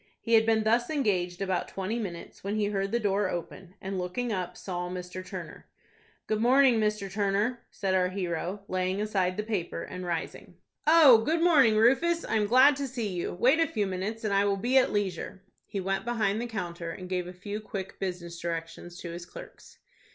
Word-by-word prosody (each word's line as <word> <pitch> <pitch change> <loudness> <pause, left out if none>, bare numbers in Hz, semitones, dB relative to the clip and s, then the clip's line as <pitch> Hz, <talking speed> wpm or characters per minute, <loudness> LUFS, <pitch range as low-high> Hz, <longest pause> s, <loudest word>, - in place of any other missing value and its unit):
He 230 - -2
had 225 0 +5
been 220 -1 +3
thus 235 +2 +2
engaged 195 - 0
about 185 -2 -1
twenty 195 +5 -3
minutes, 175 -6 -7
when 200 +2 -2
he 215 -1 +1
heard 195 -1 -1
the 235 - +1
door 200 -2 +1
open, 175 +2 -6
and, 190 0 -4
looking 215 +7 -2
up, 180 -3 -4
saw 180 -2 -4
Mr. 180 0 -6
Turner. - - -8 0.6
"Good 215 0 -1
morning, 255 0 +5
Mr. 210 -2 0
Turner," 205 +4 0
said 195 -2 -2
our 180 -1 +2
hero, 185 +1 -3
laying 185 +1 -1
aside 190 -4 0
the 210 - -1
paper, 205 -6 -3
and 185 0 -7
rising. 170 -2 -5 0.3
"Oh, 305 -7 +8
good 320 +9 0
morning, 275 -11 +5
Rufus. 325 +10 +3
I 220 - 0
am 210 -1 +1
glad 260 +5 +6
to 280 -1 -2
see 235 -4 -3
you. 180 -2 -3
Wait 255 - +4
a 330 - +3
few 210 -3 -1
minutes, 195 +4 -4
and 210 -2 0
I 200 0 +4
will 200 -1 +1
be 245 +7 0
at - - +1
leisure." 190 -1 -3 0.2
He 200 - -4
went 195 +1 -1
behind 220 -3 0
the 240 - -3
counter, 175 -6 -5
and 185 +2 -7
gave 180 -1 -2
a - - -6
few 200 +3 -6
quick 195 -2 -7
business 175 -3 -5
directions 170 +1 -5
to 170 - -6
his 175 +1 -8
clerks. - - -12
200 Hz, 205 wpm, -28 LUFS, 180-225 Hz, 0.6 s, Oh